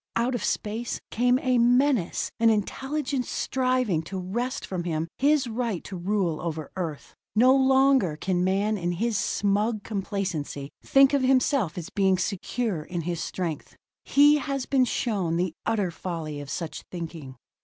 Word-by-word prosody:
Out 240 +3 +1
of 245 - -2
space 225 +3 -2
came 245 +2 +3
a 255 -2 +3
menace, 245 -4 +2
an 230 0 +5
intelligence 265 +5 -1
striving 255 -9 0
to 190 +4 -6
wrest 235 +8 -3
from 180 -2 -4
him 165 -1 -2
his 285 0 +3
right 230 -5 -2
to 195 - -7
rule 180 -3 -1
over 160 -3 -4
Earth. 165 -6 -5 0.2
No 255 +4 +6
longer 265 - +4
can 180 +1 0
man 200 +3 +1
in 175 0 -1
his 225 +6 -1
smug 205 +1 0
complacency 190 -9 -3
think 275 0 +5
of 280 - +3
himself 255 - +2
as 175 +1 -6
being 190 -2 +2
secure 195 0 -2
in 175 +3 -4
his 170 0 -3
strength. 170 -5 -4 0.3
He 290 +1 +5
has 275 -2 -3
been 265 -2 +3
shown 200 -9 -1
the 180 -1 -1
utter 205 -5 +1
folly 160 -4 -5
of 145 - -9
such 165 +1 -4
thinking. 165 -6 -7
205 Hz, 155 wpm, -26 LUFS, 175-255 Hz, 0.3 s, No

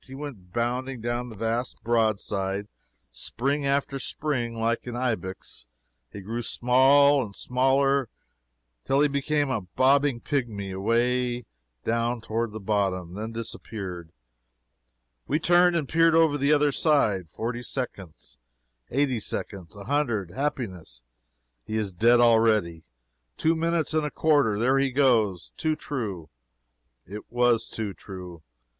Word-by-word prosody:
He 135 - -11
went 130 -11 -8
bounding 125 +3 -2
down 120 +2 -3
the 110 - -10
vast 115 +3 -2
broadside, 105 -3 0 0.4
spring 140 +3 -2
after 140 0 0
spring, 125 -6 -2
like 115 +2 -1
an 120 - -4
ibex. 110 - -4 0.4
He 100 - -8
grew 115 +5 -4
small 135 +4 +4
and 100 -3 -9
smaller 135 +1 +2 0.7
till 135 +1 +2
he 150 - +5
became 145 0 0
a 115 - -1
bobbing 130 +7 +2
pigmy, 115 -9 -3
away 120 +4 0 0.4
down 115 +1 0
toward 115 0 -2
the 110 - -6
bottom 95 -4 -1
then 110 +3 -5
disappeared. 100 -6 -6 1.2
We 145 - +1
turned 175 +2 +4
and 155 -5 0
peered 165 +2 +4
over 160 -3 +4
the 140 +1 +1
other 150 -1 +4
side 110 - +1
forty 120 +5 -4
seconds 100 - -6 0.5
eighty 135 -3 +1
seconds 95 -4 -5
a 100 - -9
hundred 120 - -1
happiness, 95 - -4 0.6
he 110 - -5
is 105 -3 -1
dead 120 +7 +4
already! 110 -8 +3 0.5
two 160 - +2
minutes 165 -1 0
and 155 -1 +2
a - - -3
quarter 145 -10 +2
"There 130 +5 +3
he 135 0 +2
goes!" 120 - +2
Too 155 -1 0
true 105 - -5 0.7
it 105 +2 -9
was 120 -1 +2
too 105 -3 -4
true. 90 -4 -10
120 Hz, 135 wpm, -26 LUFS, 105-140 Hz, 1.2 s, he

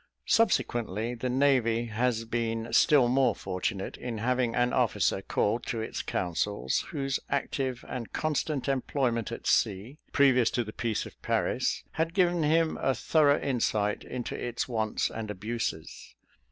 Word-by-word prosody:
Subsequently, 120 - +1
the 125 +1 -3
navy 125 -3 +2
has 115 0 -1
been 115 0 -2
still 140 -1 +5
more 130 +2 +3
fortunate, 95 +1 -3
in 120 -2 -5
having 125 +1 0
an 120 0 +2
officer - - +1
called 115 +4 0
to 115 - -2
its 110 - -3
councils, 90 -6 -1
whose 135 -2 -2
active 135 -2 -2
and 120 -3 -5
constant 155 -2 -1
employment 130 -4 0
at - - -7
sea, 105 +10 +1
previous 130 -4 +4
to 120 - -1
the 110 -1 -9
peace 115 -3 -2
of - - -13
Paris, - - 0
had 165 +2 -2
given 175 -3 +3
him 160 +1 +2
a 135 - +2
thorough 150 -2 +3
insight 110 -6 0
into 125 -2 -5
its 120 -1 -3
wants 110 -3 -1
and 110 -2 -5
abuses. 105 -5 -5
120 Hz, 145 wpm, -29 LUFS, 110-135 Hz, -, still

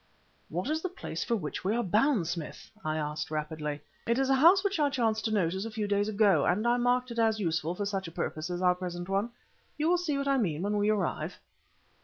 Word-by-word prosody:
"What 180 - -2
is 315 +1 0
the 370 - -2
place 345 - -5
for 235 - 0
which 160 -9 -4
we 200 +4 +1
are 240 - +1
bound, 215 - +2
Smith?" 165 -3 -6
I 155 -1 -1
said 155 0 -4
rapidly. 150 -1 -3 0.3
"It 235 +1 +2
is 270 0 +2
a - - +6
house 340 +8 +6
which 400 -4 0
I 290 -1 +3
chanced 225 -5 0
to 220 - 0
notice 190 -2 0
a 225 - -4
few 215 -1 -3
days 205 0 +1
ago, 200 -8 +3
and 200 +6 +1
I 240 +1 +3
marked 245 +1 +1
it 235 - -3
as 220 -1 +2
useful 165 -2 -1
for 205 - -2
such 195 -2 -2
a - - -8
purpose 155 0 -3
as 180 +1 -3
our 180 0 +5
present 175 -1 -5
one. 200 +4 0 0.5
You 300 +1 +1
will 355 0 +3
see 310 -5 -1
what 280 0 -2
I 275 -1 +3
mean 170 -7 -1
when 205 +1 0
we 205 +1 +2
arrive." 215 -2 -1
205 Hz, 245 wpm, -29 LUFS, 175-245 Hz, 0.5 s, a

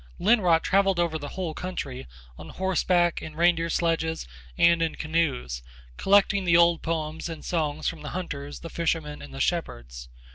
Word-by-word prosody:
Lonnrot 180 -6 +3
travelled 195 -2 +2
over 165 -2 0
the 145 - -6
whole 180 -4 -4
country, 145 -8 -5 0.3
on 80 +4 -11
horseback, 180 -2 +1
in 155 - -8
reindeer 170 0 +2
sledges 160 - -1 0.3
and 170 0 +5
in 165 -1 0
canoes, 150 - -1 0.3
collecting 200 - +3
the 170 -2 +4
old 170 -1 +4
poems 160 0 -3
and 165 -2 -8
songs 155 -3 -1
from 165 -3 -3
the 150 - -6
hunters, 145 -6 -6
the 165 - -7
fishermen 160 -3 -2
and 70 - -10
the 65 - -8
shepherds. - - -3
165 Hz, 160 wpm, -26 LUFS, 150-175 Hz, 0.3 s, and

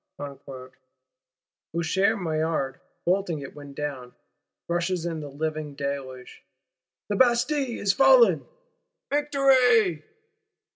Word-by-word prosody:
Sinks - - -59
the 140 -1 -8
drawbridge,—Usher 130 - -4
Maillard 160 -5 -2 0.3
bolting 180 -2 0
it 140 - -9
when 145 -1 -11
down; 135 -4 -5 0.5
rushes 175 0 -1
in 165 -2 -3
the 145 -2 -7
living 155 0 -4
deluge: 140 -2 -6 0.7
the 205 - 0
Bastille 250 +2 +2
is 195 -1 +2
fallen! 255 -9 +5 0.7
_Victoire! 260 - +3
160 Hz, 100 wpm, -25 LUFS, 140-215 Hz, 0.7 s, fallen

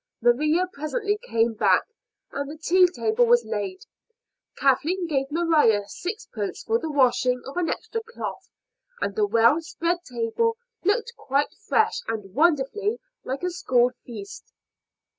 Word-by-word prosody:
Maria 300 +9 +3
presently 410 - -2
came 230 - +1
back 215 - +3 0.5
and 280 0 -4
the 310 - -8
tea 360 +3 +4
table 435 +6 +1
was 480 0 +4
laid. 380 +2 -4 0.7
Kathleen 310 +7 +2
gave 270 -4 -1
Maria 300 -11 +3
sixpence 355 - -5
for 455 +1 +1
the 320 - -4
washing 255 -3 +2
of 270 - -8
an 355 -2 0
extra 455 - -3
cloth, 470 - -6 0.5
and - - -2
the 425 -2 +2
well 235 - +4
spread 335 +2 -2
table 255 - -1 0.3
looked 450 +5 +1
quite 285 -9 0
fresh 440 -1 +2
and 205 -4 -4
wonderfully 340 - +2 0.3
like 265 +5 -4
a 360 - 0
school 250 -8 +2
feast. 205 -5 -9
315 Hz, 140 wpm, -25 LUFS, 250-405 Hz, 0.7 s, tea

